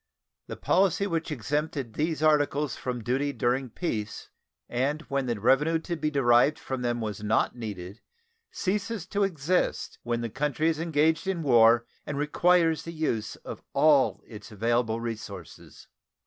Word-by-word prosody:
The - - -6
policy 195 +1 +2
which 165 -4 -2
exempted 145 -2 -2
these 155 +3 -1
articles 150 -2 +2
from 125 -2 -4
duty 135 +5 0
during 130 0 0
peace, 110 -6 -4 0.4
and 140 +6 -1
when 140 -3 -2
the 120 -3 -2
revenue 135 +8 +3
to 170 +2 -4
be 155 -1 -1
derived 135 0 +4
from 130 -1 -5
them 120 -1 -1
was 105 -2 -4
not 105 +3 +1
needed, 100 -4 -7 0.5
ceases 205 0 -2
to 200 +3 -2
exist 180 -1 -1
when 120 -1 -2
the 115 - -3
country 150 +4 0
is 160 -2 -1
engaged 160 +2 +1
in 180 -4 -1
war 115 -3 +5 0.2
and 145 - -5
requires 165 +2 +3
the 165 - -8
use 120 -9 -2
of - - -7
all 145 -1 +4
of - - -28
its 105 -2 -11
available 115 +1 0
resources. 115 -2 -8
140 Hz, 155 wpm, -27 LUFS, 120-160 Hz, 0.5 s, war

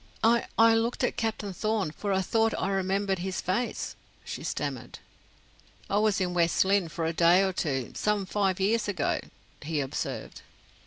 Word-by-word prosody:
"I 235 +1 +4
I 225 0 +7
looked 225 +2 0
at - - +1
Captain 215 -3 -2
Thorn, 215 -3 -1
for 200 +5 -4
I 190 0 +2
thought 225 +3 +1
I 195 - -1
remembered 195 0 0
his 185 +1 -3
face," 215 +7 -2 0.3
she - - -6
stammered. - - -4 0.9
"I 200 - +3
was 210 -3 +2
in 180 -2 -1
West 170 +1 +3
Lynne 195 -3 +2
for 160 +1 -3
a 165 - 0
day 170 +3 +5
or 190 -1 0
two, 135 -8 -2
some 210 -2 0
five 195 -1 0
years 210 +3 +1
ago," 180 -8 0 0.4
he 155 0 -2
observed. 135 -2 -4
195 Hz, 170 wpm, -28 LUFS, 175-215 Hz, 0.9 s, I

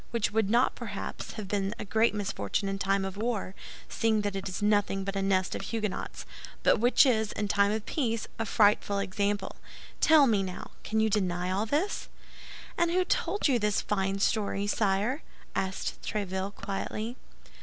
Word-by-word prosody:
—which 230 -3 0
would 215 -2 +1
not, 240 +3 +3
perhaps, - - -6
have 215 -3 -6
been 200 +1 -1
a - - -5
great 220 +2 +2
misfortune 195 - -2
in 195 0 -2
time 195 0 +1
of 195 0 -5
war, 215 -4 -2 0.3
seeing 220 -1 +1
that 205 -1 -2
it 195 0 -3
is 185 - -4
nothing 205 -2 +2
but 195 +1 -4
a 195 - 0
nest 190 -1 +1
of - - -3
Huguenots, 215 -4 -4 0.4
but - - +4
which 245 +5 +5
is, 220 -5 +2
in 210 - -2
time 200 0 +3
of 215 0 -2
peace, 230 -7 -1
a 225 - 0
frightful 205 -1 +3
example. 200 0 -1 0.4
Tell 315 -3 +7
me, 215 -6 +3
now, 185 -1 -6
can 220 - 0
you 220 - +4
deny 180 -3 0
all 200 +4 0
this?" 315 - -1 0.7
"And 340 0 +3
who 365 +2 +2
told 405 +1 +1
you 255 -4 +3
this 210 -1 +1
fine 195 -1 -1
story, 200 0 0
sire?" 210 +7 +1 0.3
asked 190 0 -3
Tréville, 195 -1 -3
quietly. 215 +4 -4
205 Hz, 175 wpm, -29 LUFS, 195-225 Hz, 0.7 s, Tell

